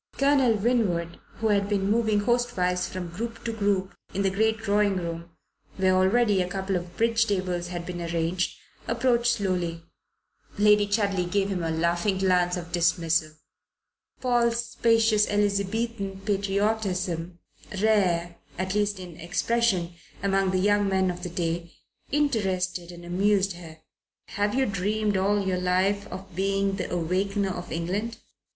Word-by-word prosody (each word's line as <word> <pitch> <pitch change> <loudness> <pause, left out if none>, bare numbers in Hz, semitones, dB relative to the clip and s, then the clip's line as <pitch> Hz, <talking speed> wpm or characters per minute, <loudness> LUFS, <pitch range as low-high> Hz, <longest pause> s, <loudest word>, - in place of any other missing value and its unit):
Colonel 275 -4 +4
Winwood, 200 -7 0 0.2
who 225 -1 -1
had 200 -1 +2
been 200 -1 +1
moving 220 -2 +2
hostwise 205 -6 0
from 180 -2 -5
group 225 +6 -6
to 230 - -2
group 200 -3 0 0.2
in 200 - 0
the 195 - +2
great 220 +3 +1
drawing 205 -2 +1
room, 170 -1 -4 0.5
where 190 -1 +3
already 195 +2 +3
a 180 - -2
couple 190 +1 -2
of 175 -1 -5
bridge 230 0 +2
tables 185 -3 -1
had 175 -1 -5
been 175 -1 -5
arranged, 170 +2 -1 0.3
approached 240 -2 +2
slowly. 180 -5 -2 0.7
Lady 210 0 +5
Chudley 200 -3 +1
gave 200 +1 +1
him 185 -3 -2
a 165 - -1
laughing 170 +4 +1
glance 180 -1 +2
of 170 -1 -7
dismissal. 165 -2 +1 0.9
Paul's 235 -2 +1
spacious 225 -2 +3
Elizabethan 200 0 -1
patriotism, 195 -4 -1 0.4
rare 180 -5 +2 0.2
at 185 +1 -2
least 205 -1 0
in 180 -3 -9
expression 185 0 0 0.3
among 195 -1 +2
the 185 - +1
young 205 +1 +2
men 190 -1 +2
of 175 0 -8
the 180 - -4
day, 170 0 -3 0.4
interested 190 - 0
and 175 0 -11
amused 195 +2 +2
her. 165 -2 -11 0.5
"Have 205 +2 -1
you 265 0 +3
dreamed 205 +1 0
all 200 +1 +1
your 185 -1 0
life 190 +3 +1
of 190 -2 -9
being 195 +1 0
the 180 - -4
Awakener 190 +4 0
of 175 -1 -7
England?" 200 +8 -2
195 Hz, 145 wpm, -26 LUFS, 180-210 Hz, 0.9 s, Lady